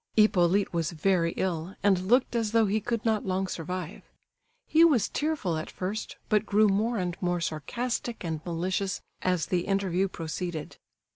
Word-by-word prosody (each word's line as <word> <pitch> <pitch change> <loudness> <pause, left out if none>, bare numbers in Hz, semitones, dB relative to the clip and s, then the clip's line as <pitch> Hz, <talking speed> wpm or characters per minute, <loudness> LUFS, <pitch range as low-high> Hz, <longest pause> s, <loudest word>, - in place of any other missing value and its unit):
Hippolyte 195 -3 +3
was 165 -1 -1
very 170 +1 +2
ill, 180 0 -2
and 190 -2 +3
looked 245 +2 +3
as 225 -2 0
though 225 -1 +5
he 210 +2 0
could 235 -1 -2
not 220 -2 +2
long 190 0 0
survive. 180 -1 -5 0.6
He 320 +1 +5
was 280 -11 +5
tearful 290 - -1
at 155 - -5
first, 195 +4 -4
but 210 -1 +3
grew 215 0 +4
more 215 +4 +1
and 180 -3 -2
more 175 -1 0
sarcastic 230 - -3
and 160 -3 -3
malicious 180 +2 -2 0.2
as 180 -3 +1
the 180 -1 -1
interview 195 -1 +1
proceeded. 165 -1 -5
190 Hz, 160 wpm, -28 LUFS, 175-215 Hz, 0.6 s, though